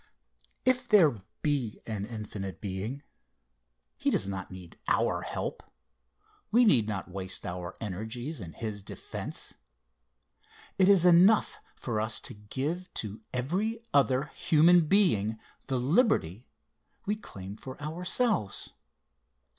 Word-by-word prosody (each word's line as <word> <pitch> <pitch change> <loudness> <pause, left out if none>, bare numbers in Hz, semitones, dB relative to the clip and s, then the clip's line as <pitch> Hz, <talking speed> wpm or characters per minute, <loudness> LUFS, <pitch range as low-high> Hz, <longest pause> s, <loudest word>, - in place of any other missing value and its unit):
If 255 0 +3
there 160 - +5 0.2
be 140 -8 0
an 105 -2 -3
infinite 105 -4 -6
Being, 105 +8 -4 0.9
he - - +1
does 95 - +1
not 95 -1 -4
need 90 -2 -11
our - - +2
help - - -4 0.9
we 240 +4 +5
need 120 - +5
not 100 -3 -4
waste 95 0 -5
our 90 0 -5
energies 110 - -5
in 85 -3 -8
his 105 -3 -5
defence. - - -7 1.3
It 190 0 +6
is 190 -3 +6
enough 180 +5 +5 0.2
for 110 -4 -2
us 110 0 0
to - - -6
give 135 - -4
to 105 0 -4
every 185 - -1
other 135 -2 +4
human 165 +1 +5
being 115 - +3 0.3
the 130 - 0
liberty 125 - +2 0.6
we 210 - 0
claim 100 - -9
for 130 +4 -9
ourselves. 175 - -1
125 Hz, 120 wpm, -29 LUFS, -, 1.3 s, It